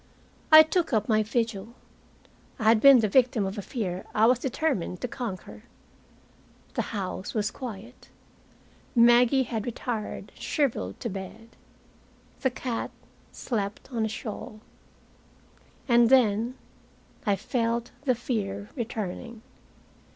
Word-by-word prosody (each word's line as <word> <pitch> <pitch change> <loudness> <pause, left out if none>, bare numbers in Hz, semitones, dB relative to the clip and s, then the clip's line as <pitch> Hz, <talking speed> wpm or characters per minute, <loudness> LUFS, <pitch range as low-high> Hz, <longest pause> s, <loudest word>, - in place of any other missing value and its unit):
I 310 0 +11
took 315 -1 -1
up 215 -1 +1
my 215 -1 +3
vigil. 225 0 -2 0.8
I 235 - -5
had 220 0 +5
been 275 -3 +8
the 215 - +2
victim 240 -1 +3
of 195 +2 -4
a - - -2
fear 190 -5 -4
I 215 - +5
was 245 +1 +4
determined 250 - -2
to - - -2
conquer. 225 -6 -6 1.1
The - - 0
house 195 -1 -4
was 210 -1 0
quiet. 235 -1 -9 0.9
Maggie 240 +3 +5
had 225 -3 -4
retired 235 -2 -4
shriveled 230 - -2
to 235 - -2
bed. 195 +4 -8 0.9
The 260 - +1
cat 245 -2 -4 0.4
slept 205 0 -4
on 230 - -1
the 220 - 0
shawl. 215 0 -7 1.3
And 235 -2 +5
then 235 -1 +3 0.7
I 200 - +4
felt 230 +3 -2
the 255 -2 +3
fear 205 -4 -3
returning. 230 -1 -5
230 Hz, 120 wpm, -27 LUFS, 210-245 Hz, 1.3 s, I